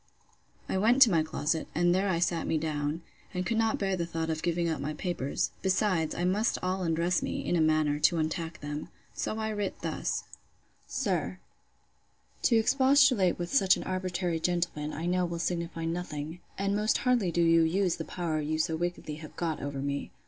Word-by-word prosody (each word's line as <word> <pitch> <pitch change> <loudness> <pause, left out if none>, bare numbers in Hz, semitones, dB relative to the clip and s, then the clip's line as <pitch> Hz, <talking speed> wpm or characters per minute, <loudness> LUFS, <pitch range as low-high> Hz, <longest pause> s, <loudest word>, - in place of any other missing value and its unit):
I 190 - 0
went 235 +6 +4
to 230 - +3
my 165 -3 +4
closet, 155 0 -1
and 175 +1 +3
there 190 +2 +1
I 175 - +1
sat 170 -1 0
me 160 - +1
down, 150 +1 -2 0.3
and 180 0 -1
could 225 +3 0
not 225 -1 +2
bear 195 -1 0
the 170 -2 -2
thoughts 165 -1 -2
of 160 0 -3
giving 170 0 0
up 160 -2 -2
my 150 +2 -3
papers. 165 -5 -2
Besides, 185 -4 +1
I 175 - -2
must 205 +5 +1
all 185 +1 -1
undress 170 +1 +1
me, - - -3
in - - +1
a 165 - +3
manner, 155 -2 +2
to 170 - +4
untack 160 +1 -2
them. 145 +1 -5 0.2
So 215 - -3
I 220 0 -2
writ 205 -2 -3
thus: - - -2 0.6
'SIR, 185 - -1 1.0
'To 235 - +3
expostulate 260 -4 +4
with 175 0 -4
such 195 -9 +5
an - - -5
arbitrary 180 -2 -2
gentleman, 170 -3 -1
I 160 - -4
know 180 +1 +1
will 170 -1 -2
signify 170 -1 -2
nothing; 165 -1 -4 0.2
and 195 +1 0
most 210 +1 +2
hardly 245 -8 +2
do 170 +1 +2
you 165 0 +5
use 175 +2 +1
the 165 - -4
power 160 -3 -2
you 155 +1 -1
so 160 +1 0
wickedly 170 -2 -3
have 155 -1 -11
got 165 -3 -2
over 140 -1 -4
me. 140 0 -3
170 Hz, 195 wpm, -29 LUFS, 160-190 Hz, 1.0 s, such